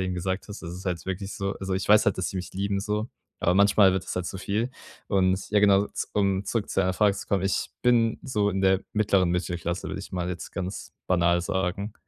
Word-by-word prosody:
grade - - 0
eben 90 0 -2
gesagt 95 +2 -3
hast. 105 - -8
Das 85 - -6
ist 90 +2 -8
halt 90 -4 -3
wirklich 95 +1 -4
so 100 0 -2
also 95 -1 -2
ich 95 - -3
weiß 105 +1 +6
halt, 100 - +2
dass 95 - 0
die - - -5
mich 90 -1 -5
lieben 100 +1 -1
so, 105 +2 -2 0.3
aber 90 - +2
manchmal 100 0 +5
wird 95 -1 -1
das - - -5
halt 90 -1 -2
zu 95 - -5
viel. 105 +6 -1 0.4
Und 95 -1 +1
ja, 105 0 +4
genau, 100 0 +5
z - - -5
um 100 -1 +1
zurück 110 +1 -2
zu - - 0
deiner 95 -1 +1
Frage 100 +1 +3
zu - - -8
kommen, 95 -2 +1
ich 95 -1 0
bin 115 -2 +3
so 105 -6 +1
in 95 - -2
der 95 0 +4
mittleren 100 -4 +2
Mittelklasse, 85 0 -2
würde - - -4
ich 100 - -10
mal 90 -2 -2
jetzt 90 -2 -5
ganz 95 0 -5
banal 85 -1 +3
sagen. 95 +3 -2
95 Hz, 250 wpm, -26 LUFS, 90-100 Hz, 0.4 s, weiß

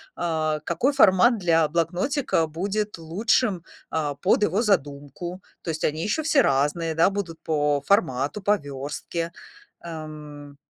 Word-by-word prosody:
а, 155 -3 -1
какой 210 - +1
формат 230 +1 +5
для 165 -4 +3
блокнотика 175 - 0
будет 200 +6 -3
лучшим, 190 +3 0 0.3
а, 150 -3 -1
под 185 +8 +2
его 205 +4 +1
задумку. 170 - -2 0.2
То - - -6
есть 155 -1 -3
они 155 +1 -1
еще 215 - -1
все 305 -2 +4
разные, 150 - +1
да, 165 +4 +4
будут 180 -5 -4
по 145 -2 +1
формату, 145 - +1
по 205 +2 +3
верстке. 145 +3 -5 0.5
Ам 150 -3 -9
165 Hz, 135 wpm, -24 LUFS, 150-200 Hz, 0.5 s, формат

